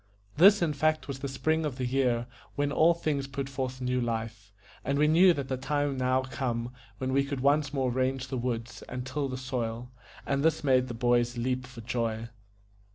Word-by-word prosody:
This 195 +3 +7
in 155 -3 +1
fact 155 -1 +1
was 135 -2 -5
the 140 - -3
spring 155 +4 0
of 150 -4 -2
the 130 - -2
year, 125 -2 +1 0.3
when 145 0 0
all 165 +3 +4
things 145 -4 -1
put 135 0 -4
forth 130 -1 -4
new 125 0 0
life; 110 -3 -4 0.3
and 140 - 0
we 150 +1 +4
knew 175 +4 +6
that 140 -5 -2
the 130 - -2
time 145 +2 0
was 135 -2 -4
now 130 +1 +2
come 125 -2 -3 0.3
when 130 0 -2
we 140 +1 +3
could 140 -2 -4
once 145 +1 +3
more 135 -3 0
range 130 +1 -1
the 135 - -3
woods 120 -1 -3
and 125 0 -5
till 140 +1 -2
the 130 - -4
soil, 125 -2 -4 0.3
and 140 0 0
this 160 0 +2
made 130 -2 +3
the 120 - -5
boys 120 0 +2
leap 130 +1 -1
for 125 -2 -10
joy. 115 -1 -2
130 Hz, 210 wpm, -29 LUFS, 125-145 Hz, 0.3 s, This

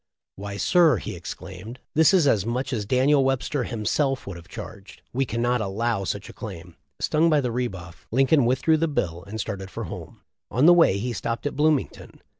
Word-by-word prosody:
"Why, 100 +1 -6
sir,'' 165 - +4
he - - -6
exclaimed, 95 +7 -8
"this 160 0 +5
is 185 -6 +4
as 110 -9 +3
much 125 +4 -2
as 105 -4 -2
Daniel 135 +4 +3
Webster 135 0 0
himself 130 +5 -1
would 100 - -6
have 85 0 -12
charged. 100 -1 -10
We 135 +2 +1
cannot 120 +1 0
allow 105 +1 -1
such - - -4
a - - -11
claim." - - -9 0.2
Stung 160 +2 +2
by 155 -2 +4
the 125 -4 -1
re 125 +1 0
buff, 90 -4 -11
Lincoln 135 +1 +3
withdrew 140 +6 +3
the 165 +1 +1
bill, 90 - -2
and 110 +2 -6
started 95 -3 -4
for - - -6
home. - - -9 0.3
On 125 +7 +2
the 175 - +9
way 165 - +5
he 120 +4 -3
stopped 115 +3 -4
at 145 - -2
Bloomington. 150 -1 -1
120 Hz, 200 wpm, -24 LUFS, 100-140 Hz, 0.3 s, the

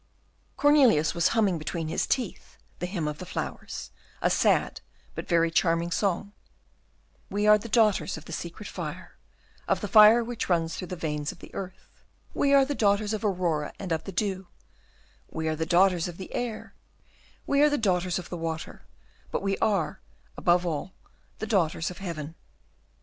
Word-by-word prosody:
Cornelius 265 - +5
was 170 -1 +2
humming 200 -7 +2
between 160 +1 -4
his 160 - -1
teeth 245 -8 -3 0.2
the 180 - -2
"Hymn 175 -5 -3
of 150 0 -4
Flowers," 180 -1 -6 0.3
a - - +1
sad - - +2 0.3
but - - -6
very 165 -1 +3
charming 170 0 +1
song, 200 +1 -1 1.0
"We 205 +1 -1
are 210 0 +7
the 230 - -8
daughters 215 -5 +2
of 160 - -11
the 170 - -8
secret 175 +6 -6
fire - - -7 0.5
Of - - +2
the - - -4
fire 220 +2 +7
which 235 -3 -4
runs 165 -2 +1
through 180 - -6
the 180 - -5
veins 150 -3 -3
of - - -14
the - - -14
earth; 190 -1 -7 0.5
We 280 - +1
are 275 -1 +6
the 290 - -2
daughters 205 -2 +1
of 215 - -3
Aurora 175 -7 0
and 190 -3 -6
of 160 -1 -1
the - - -5
dew; 190 0 -2 0.8
We 160 0 -3
are 155 - 0
the 160 +1 -3
daughters 180 0 +3
of 175 -1 -8
the 190 - -9
air; 240 -3 -4 0.7
We 280 0 +2
are 300 - +6
the 290 - +1
daughters 180 -5 +1
of 180 - -7
the 175 - -5
water; 165 -1 -5 0.5
But - - -3
we 195 0 +1
are, 195 -4 0 0.4
above 175 0 +2
all, 170 +3 -3 0.4
the 220 - -4
daughters 175 -6 0
of 180 - -11
heaven." 165 -5 -5
185 Hz, 175 wpm, -27 LUFS, 165-210 Hz, 1.0 s, are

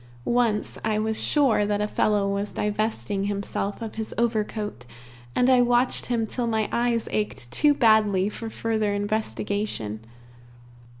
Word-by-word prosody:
Once, 235 -3 0
I 215 -1 +1
was 220 0 0
sure 275 -8 +3
that 205 0 0
a 210 - 0
fellow 210 -1 +1
was 200 +1 -2
divesting 210 -1 -1
himself 200 +1 -3
of 220 - -6
his 220 - -6
overcoat, 215 - -1 0.5
and 250 - +3
I 255 -1 +6
watched 245 +1 +2
him 235 -2 0
till 240 +2 -2
my 220 -2 0
eyes 235 -1 0
ached 205 - -3
too 295 -1 +3
badly 215 -6 +4
for 225 +2 -5
further 220 -2 -1
investigation. 205 - -2
215 Hz, 140 wpm, -25 LUFS, 205-230 Hz, 0.5 s, I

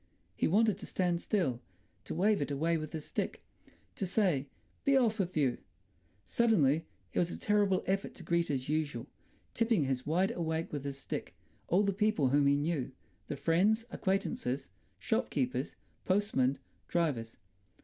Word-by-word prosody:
He - - +1
wanted 210 +2 +3
to - - -8
stand 175 -2 0
still, 140 - 0 0.4
to - - -4
wave 200 +1 +3
it 145 - -1
away 160 +4 +1
with 155 -2 -3
his 155 -2 -5
stick, - - -3 0.5
to 195 - -3
say, 175 -8 +1 0.4
"Be 275 -1 +4
off 230 -4 +2
with 180 -4 -1
you!" 135 -5 +2 0.7
Suddenly 165 - +3 0.3
it - - +1
was 175 - +2
a - - -5
terrible 205 -3 +2
effort 195 +1 -1
to - - -10
greet 170 0 +1
as 135 -3 -1
usual—tipping 155 - -2
his 130 -2 -1
wide 180 +7 +1
awake 160 -5 -2
with 145 -2 -3
his 140 -1 -3
stick—all 180 +6 -3
the 200 -1 +1
people 205 -9 +2
whom 140 +1 +4
he 140 0 +4
knew, 145 -3 -1 0.4
the - - -3
friends, 200 +10 +2
acquaintances, 195 - -1 0.3
shopkeepers, 130 +1 -1 0.3
postmen, 185 -10 +2 0.3
drivers. 135 -10 -1
170 Hz, 150 wpm, -32 LUFS, 140-200 Hz, 0.7 s, Be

